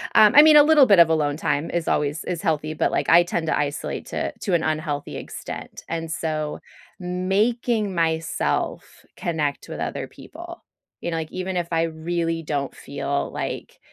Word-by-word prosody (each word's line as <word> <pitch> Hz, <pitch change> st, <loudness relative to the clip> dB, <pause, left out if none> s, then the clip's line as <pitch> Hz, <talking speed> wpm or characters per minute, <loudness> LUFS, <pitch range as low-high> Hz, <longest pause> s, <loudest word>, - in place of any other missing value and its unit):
Um, 215 Hz, -1 st, +7 dB
I 295 Hz, -, +11 dB
mean, 310 Hz, 0 st, +7 dB
a 295 Hz, -, +9 dB
little 300 Hz, -3 st, +6 dB
bit 200 Hz, -6 st, +5 dB
of 170 Hz, -, +8 dB
alone 150 Hz, -3 st, +1 dB
time 150 Hz, -1 st, -1 dB
is 170 Hz, -1 st, -2 dB
always 150 Hz, +1 st, 0 dB
is 175 Hz, -1 st, -3 dB
healthy, 155 Hz, -3 st, -1 dB
but, -, -, 0 dB
like, -, -, -1 dB
I 170 Hz, +1 st, +7 dB
tend 170 Hz, -1 st, -3 dB
to -, -, +1 dB
isolate 145 Hz, 0 st, -3 dB
to -, -, -3 dB
to 195 Hz, -, -1 dB
an 170 Hz, -, +3 dB
unhealthy 155 Hz, -2 st, -2 dB
extent, -, -, -8 dB
and 165 Hz, -1 st, -3 dB
so, 155 Hz, -2 st, -3 dB, 0.4 s
making 200 Hz, +4 st, 0 dB
myself 165 Hz, 0 st, -2 dB
connect 155 Hz, -6 st, -2 dB
with -, -, -6 dB
other -, -, -3 dB
people, 345 Hz, +2 st, -11 dB, 0.4 s
you 170 Hz, -, -3 dB
know, -, -, -2 dB
like, 160 Hz, -1 st, -5 dB
even 185 Hz, 0 st, -4 dB
if 170 Hz, -1 st, -1 dB
I 165 Hz, 0 st, +2 dB
really 165 Hz, 0 st, -2 dB
don't 140 Hz, -2 st, -3 dB
feel 140 Hz, 0 st, -3 dB
like -, -, -5 dB
165 Hz, 180 wpm, -23 LUFS, 155-185 Hz, 0.4 s, I